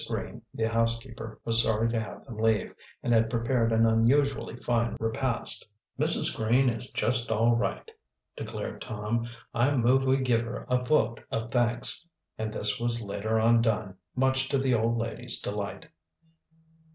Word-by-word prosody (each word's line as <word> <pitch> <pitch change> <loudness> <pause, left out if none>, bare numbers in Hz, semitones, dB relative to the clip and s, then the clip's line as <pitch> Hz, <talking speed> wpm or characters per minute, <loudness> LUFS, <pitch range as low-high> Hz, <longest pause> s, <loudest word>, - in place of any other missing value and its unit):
Green, - - -5
the 110 - -4
housekeeper, 115 0 -2
was 115 0 +5
sorry 110 0 +1
to 115 - 0
have 110 - -8
them 115 -5 -9
leave, 110 -3 +1 0.3
and 120 - +1
had 110 0 +3
prepared 115 0 0
an 115 0 +3
unusually 115 +3 +2
fine 120 -1 -1
repast. 115 +2 -1 0.4
"Mrs. - - +4
Green 120 +4 +2
is 115 +2 +1
just 120 +1 +1
all 115 +2 +3
right," 125 - -3 0.4
declared - - -6
Tom. 110 +2 -3 0.3
"I 130 +5 +2
move 130 +2 +3
we 130 +1 +3
give 125 -4 +1
her 115 +1 -6
a 125 0 +2
vote 120 -5 +1
of 115 0 -4
thanks." 120 +6 +3 0.3
And 110 0 -4
this 105 0 -1
was 120 -1 0
later 105 +2 -2
on 115 +1 +4
done, 105 -4 -1 0.2
much 130 0 +1
to 140 - +1
the 130 -1 +1
old 115 0 +1
lady's 115 0 +1
delight. - - -5
115 Hz, 160 wpm, -28 LUFS, 110-125 Hz, 0.4 s, was